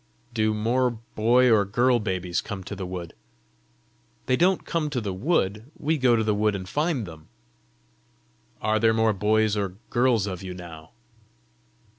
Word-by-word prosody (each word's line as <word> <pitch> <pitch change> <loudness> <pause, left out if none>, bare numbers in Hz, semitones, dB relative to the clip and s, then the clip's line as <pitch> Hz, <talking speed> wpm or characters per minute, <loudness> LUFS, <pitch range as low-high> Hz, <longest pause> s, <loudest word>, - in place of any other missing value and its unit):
"Do 110 -2 +1
more 120 +4 +1
boy 120 +2 +2
or 105 -2 +5
girl 120 +5 +2
babies 95 -4 -2
come 100 -3 -6
to 100 - -6
the 95 -2 -5
wood?" 90 -2 -6 1.1
"They 130 - +2
don't 180 +5 +2
come 160 -3 -1
to 140 -4 -2
the 100 -4 -3
wood; 110 - -1
we 155 +1 0
go 125 -2 +4
to 110 - +1
the 105 -1 +1
wood 105 0 +1
and 95 -1 -6
find 150 - -1
them." 80 -3 -12 1.4
"Are 110 0 +2
there 110 0 +3
more 110 -1 +3
boys 110 +2 +2
or 100 -3 -2 0.2
girls 120 -4 +2
of 95 -3 -5
you 95 -1 -6
now?" 80 -3 -10
110 Hz, 165 wpm, -25 LUFS, 95-125 Hz, 1.4 s, or